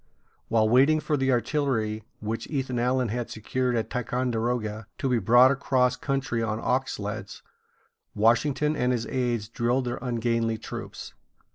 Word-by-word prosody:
While 110 -1 +3
waiting 135 +7 +5
for 150 - -1
the 135 -1 +1
artillery 120 -5 0 0.2
which 110 +2 -3
Ethan 130 -4 -2
Allen 125 0 +1
had 120 +2 -3
secured 125 +3 -1
at 115 - -2
Ticonderoga 120 -3 -2
to - - -1
be 125 -2 +2
brought 120 +6 +6
across 130 -2 +2
country 135 -4 -2
on 110 -1 -1
ox 130 +3 0
sleds, 105 -1 -6 0.7
Washington 140 +7 +2
and 125 -2 +1
his 115 -2 -2
aids 120 -4 -1
drilled 120 +3 0
their 120 - -3
ungainly 115 -2 0
troops. - - -8
120 Hz, 145 wpm, -26 LUFS, 115-130 Hz, 0.7 s, brought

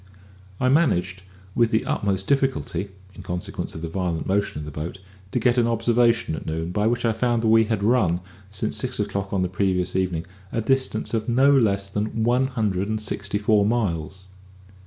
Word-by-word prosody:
I 125 - +2
managed, 100 - +2 0.3
with 115 +1 +3
the 110 0 +1
utmost 95 -2 -1
difficulty, 135 -7 0 0.3
in - - -10
consequence 90 0 -4
of 80 - -7
the - - -2
violent 85 -1 -2
motion 100 -1 0
of 75 - -5
the 75 - -7
boat, 75 +6 -5 0.3
to - - -2
get 125 -1 +3
an 115 - +3
observation 115 -3 +2
at - - -6
noon, 80 +2 -3
by 105 +3 +1
which 120 +1 0
I 115 - +2
found 120 +1 0
that 110 - +3
we 110 0 +5
had 110 -2 -1
run, 105 -7 +3 0.3
since 105 +2 -3
six 130 -2 -2
o'clock 100 -1 -2
on 95 -2 +1
the - - +1
previous 90 -1 0
evening, 90 -3 0 0.3
a - - -1
distance 135 +3 0
of 110 0 -1
no 130 +4 +5
less 100 -7 +3
than 105 +3 -2
one 125 +3 +3
hundred 105 -6 -1
and 110 0 -1
sixty 100 -1 -2
four 105 0 +3
miles. 95 -5 -1
105 Hz, 195 wpm, -24 LUFS, 95-115 Hz, 0.3 s, we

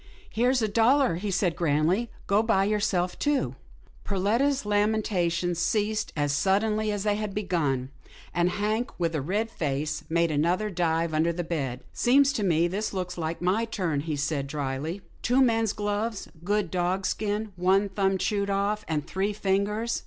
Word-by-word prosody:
Here's 245 +1 +2
a - - +2
dollar/* 230 - +3
he 200 +3 -3
said, 180 -2 +1
grandly, 170 +8 +1 0.2
go 200 +2 +3
buy 220 -4 +2
yourself 200 -4 0
two." 290 -2 0 0.5
Perletta's 230 +8 +1
lamentations 200 -5 +1
ceased 215 +4 0
as 145 -2 0
suddenly 210 +6 +1
as 205 -1 -2
they 205 -1 +1
had 210 -2 -4
begun, 150 -10 -1 0.4
and 175 +1 +2
Hank, 215 +5 -1
with 170 -1 0
a 155 - -1
red 210 +10 -1
face, 150 -2 -2
made 170 0 +2
another 175 +8 +1
dive 165 -2 0
under 160 +2 +2
the 175 +1 -3
bed. 135 -7 -3
" - - -27
Seems 275 +3 +4
to 215 - -1
me 170 -2 +3
this 205 +5 -3
looks 180 -1 -3
like 165 0 -4
my 190 +6 +2
turn," 180 -10 -1
he 155 +1 -3
said, 145 -1 -1
drily. 145 +5 -3
" - - -28
Two 250 +3 +2
men's 225 -3 +2
gloves 210 +1 -2
— 165 - -20
good 205 -1 0
dogskin 195 +4 -1
— - - -31
one 190 +3 +3
thumb 195 0 0
chewed 200 +1 -1
off, 200 +2 0
and 150 -2 -1
three 195 +2 -1
fingers. 210 +3 0
195 Hz, 175 wpm, -27 LUFS, 170-215 Hz, 0.5 s, Seems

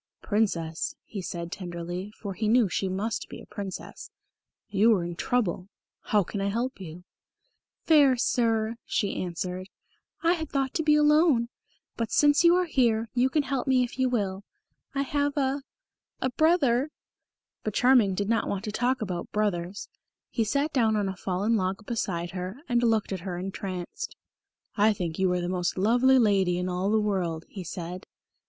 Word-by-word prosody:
"Princess," 170 -7 -1
he 200 - -6
said 170 -1 -5
tenderly, 175 +1 -5
for 200 -3 -5
he 215 +3 -2
knew 230 0 +4
she 190 +1 -1
must 205 +4 -3
be - - -8
a - - -12
Princess, 200 -3 -7 0.6
"you 210 +3 +4
are 180 - -1
in 175 0 -5
trouble. 195 -3 -1 0.4
How 210 -2 +3
can 195 +3 -5
I 195 - 0
help 235 +5 -2
you?" 175 0 -9 0.8
"Fair 285 -5 +5
Sir," 230 -2 +1
she 200 - -1
answered, 180 +1 -4 0.5
"I 335 +1 +4
had 320 -4 -4
thought 270 -1 -1
to - - 0
be 300 -1 +4
alone. 300 -5 +4 0.5
But, 230 -2 -2
since 290 +2 +4
you 340 0 +7
are 365 0 +2
here, 230 -7 +1
you 255 +1 +3
can 300 +2 +1
help 270 -1 -2
me 260 -1 +4
if 245 +1 -6
you 260 -1 +3
will. 200 -5 -1 0.5
I 275 - +1
have 285 +1 -1
a 275 0 +1 0.6
a 260 - -1
brother 285 -3 +3 0.4
" - - -64
But 215 - -3
Charming 245 -7 +4
did 200 +1 -1
not 230 +1 +1
want 200 0 -2
to 215 - -3
talk 245 +2 0
about 180 -4 -4
brothers. 200 -3 -1 0.4
He 230 - +1
sat 280 +8 0
down 225 -5 +3
on 205 -2 0
a 190 - -4
fallen 195 +5 0
log 190 +1 -2
beside 175 -7 -2
her, 185 +4 -5
and 240 -1 +2
looked 225 -4 +1
at 190 - -3
her 180 0 -5
entranced. 185 -1 -5 0.6
"I 215 +1 +4
think 170 -4 -4
you 190 -1 +3
are 180 - 0
the 175 - -2
most 180 -1 -1
lovely 245 +7 +4
lady 195 -6 +3
in 180 +1 -2
all 180 +2 -1
the 220 +1 +3
world," 180 -6 -1
he 190 - -8
said. 175 +2 -6
210 Hz, 180 wpm, -27 LUFS, 185-250 Hz, 0.8 s, you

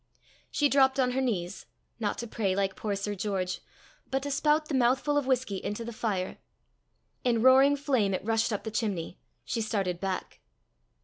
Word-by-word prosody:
She 290 - +2
dropped 270 -1 +4
on 250 -1 +3
her 265 +2 0
knees 200 -7 -2 0.3
not 210 -3 -1
to 235 - -5
pray 200 -4 -1
like 195 -1 0
poor 210 -2 -2
Sir 200 +1 -3
George 190 -2 -2 0.5
but 270 0 -1
to 285 - -3
spout 300 +2 +2
the 295 - -4
mouthful 260 +3 +2
of 290 -2 +1
whisky 250 -7 0
into 210 +3 -3
the 235 - -6
fire. 200 -5 -2 0.8
In 235 -2 +2
roaring 265 +2 +7
flame 255 -9 +1
it 185 - -5
rushed 225 +1 +1
up 205 -1 -2
the 220 - -4
chimney. 205 -7 -2 0.3
She 230 - -2
started 195 -5 -1
back. 190 -1 -4
225 Hz, 180 wpm, -29 LUFS, 200-265 Hz, 0.8 s, roaring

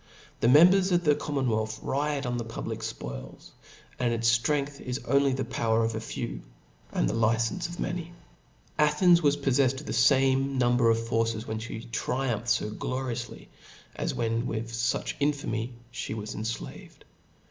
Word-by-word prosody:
The - - +2
members 180 +8 +6
of 175 0 +3
the 150 -2 +5
commonwealth, 115 -8 -1
riot 145 0 -1
on 120 0 -1
the 120 - -2
public 85 - -5
fpoils, - - -7 0.5
and 125 -2 +1
its 115 0 +3
ftrcngth 140 +3 -1
is 125 -1 -3
only 140 0 +3
the 130 0 -2
power 115 0 +1
of 115 - -1
a 110 - -3
fewj 115 - -5 0.5
and - - +1
the - - -1
li 115 0 +3
centioufnefs 160 +10 -2
of 175 - -9
many. 175 -1 -3 0.7
Athens 160 +4 +5
was 145 -2 +3
poffefled 135 -2 +2
of - - -12
the - - -4
fame 135 +2 +3
humber 120 -1 +3
of 115 - +4
forces^ 115 -1 -1
when 110 -1 -3
(he 115 0 -6
triumphed 120 -1 -1
fo 105 - -4
glorioufly, 125 -1 -4 0.5
and - - -2
when 115 0 -1
withfo 115 +1 -1
much - - -4
infamy 135 -5 -1 0.2
(he 120 -2 -4
was 105 -1 -5
enflaved. 110 +2 -6
120 Hz, 165 wpm, -28 LUFS, 115-140 Hz, 0.7 s, members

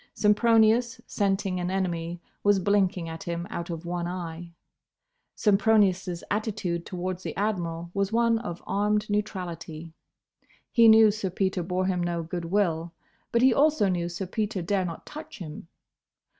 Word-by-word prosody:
Sempronius, 225 +2 +3
scenting 195 -2 0
an 175 0 -2
enemy, 175 -3 -2 0.2
was 205 -1 +4
blinking 190 -3 +1
at 165 0 -7
him 170 0 -4
out 170 0 -4
of 165 0 -5
one 175 0 -2
eye. 170 -1 -6 0.8
Sempronius' 195 -4 +2
attitude 205 -5 -2
towards 180 0 -4
the - - -5
Admiral 170 -5 -2
was 200 0 0
one 230 0 +3
of 175 -7 -6
armed 210 +1 0
neutrality. 170 -6 -4 0.8
He 230 -2 +6
knew 220 -1 +8
Sir 205 -2 -3
Peter 190 0 -1
bore 180 +2 -1
him 185 -2 0
no 170 -1 -1
good 170 +1 -5
will, 170 -3 0 0.4
but 235 +1 +2
he 260 -1 +6
also 295 -6 +3
knew 175 -2 -1
Sir 175 +3 -4
Peter 205 -1 -2
dare 190 +1 0
not 165 -2 -6
touch 310 +1 -9
him. 160 -3 -8
185 Hz, 150 wpm, -27 LUFS, 170-210 Hz, 0.8 s, knew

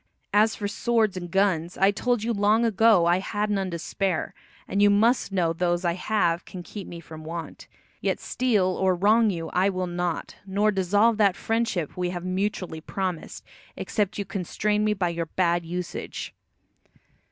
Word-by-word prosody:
As 215 +2 +4
for 205 - -3
swords 220 -1 +1
and 175 -1 -5
guns, 180 -3 +1
I 195 +1 +4
told 240 +2 0
you 235 +1 0
long 210 +3 +3
ago 220 -4 +4
I 175 +2 +3
had 210 +2 -2
none 195 -2 0
to 170 - -4
spare, 180 +1 -2 0.3
and 200 - 0
you 205 - +6
must 220 +2 +3
know 175 -4 +1
those 175 +1 0
I 170 - +2
have 180 -2 0
can 180 -1 -9
keep 195 +3 -8
me 170 - -8
from 160 -1 -11
want. 165 0 -7 0.3
Yet - - 0
steal 230 -7 +1
or 185 0 +1
wrong 215 +5 +4
you 165 -4 -4
I 190 +2 +3
will 185 -1 -2
not, 175 -1 -3
nor 205 +2 +1
dissolve 205 +4 +2
that 200 -4 +4
friendship 225 -8 -1
we 180 -1 -1
have 175 0 -5
mutually 185 -3 -2
promised, 185 -1 -4 0.3
except 210 -1 -1
you 200 - -2
constrain 210 +3 -1
me 210 0 +2
by 185 -3 0
your 170 -1 -3
bad 175 0 +1
usage." 180 +1 -5
190 Hz, 175 wpm, -25 LUFS, 175-210 Hz, 0.3 s, you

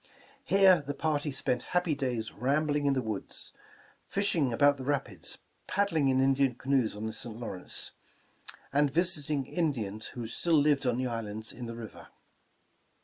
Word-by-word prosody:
Here 190 -4 +6
the 145 0 -5
party 150 0 0
spent 125 -2 -1 0.2
happy 175 -3 +2
days 125 -5 -2
rambling 145 +2 +1
in 140 - +4
the 130 - 0
woods, 110 -3 -5 0.5
fishing 175 -9 +1
about 145 +4 +4
the 130 - -6
rapids, 135 - -2 0.3
paddling 175 -8 +2
in 130 0 +3
In 135 +1 +4
dian 135 -2 +2
canoes 130 -4 +1
on 105 +1 -5
the 110 - -3
St. 115 -3 -8
Lawrence, 95 -6 -5 0.8
and 145 0 +4
visiting 150 -3 0
Indians 115 - -2
who 120 -2 -6
still 160 +8 +2
lived 145 -2 +3
on 125 +1 +1
islands 110 -2 -4
in 120 -1 -7
the 115 - -6
river. 115 -2 -9
135 Hz, 155 wpm, -30 LUFS, 115-150 Hz, 0.8 s, Here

